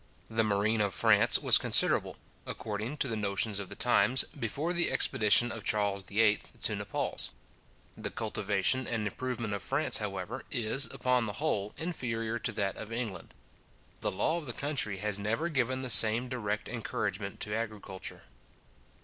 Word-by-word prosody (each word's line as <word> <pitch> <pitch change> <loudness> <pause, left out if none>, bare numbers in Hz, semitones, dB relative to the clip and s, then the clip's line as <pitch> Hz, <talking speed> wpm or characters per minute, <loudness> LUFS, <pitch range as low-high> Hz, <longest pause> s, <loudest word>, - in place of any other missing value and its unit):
The 115 0 +1
marine 105 +1 0
of 100 -2 -1
France - - +4
was - - +5
considerable, - - +3 0.3
according 110 +6 -5
to 140 - 0
the 115 - -2
notions 100 0 0
of 100 - -7
the - - -9
times, 110 +7 +4 0.2
before 140 +9 -2
the 175 0 +2
expedition 110 +3 +4
of - - -6
Charles 100 -2 0
VIII. 105 +2 +2 0.2
to - - +2
Naples. - - -2 0.7
The - - -3
cultivation 105 +3 -1
and 110 -3 -2
improvement 120 0 -4
of 100 - -4
France, - - +1
however, - - -5
is, 120 +5 +4
upon 125 -2 0
the 105 - -4
whole, 105 -9 -2
inferior 120 -9 -3
to 120 - -2
that 100 -3 -3
of 110 - -8
England. 115 -4 -5 0.6
The - - 0
law 160 - -1
of 160 -4 -7
the 120 - -2
country 140 -9 -1
has 105 +1 -1
never 115 +11 -2
given 130 -3 -1
the 130 - -2
same 115 +3 +6
direct 110 -4 -4
encouragement 100 -4 -4
to 105 - -1
agriculture. 105 -4 -6
110 Hz, 160 wpm, -30 LUFS, 105-125 Hz, 0.7 s, same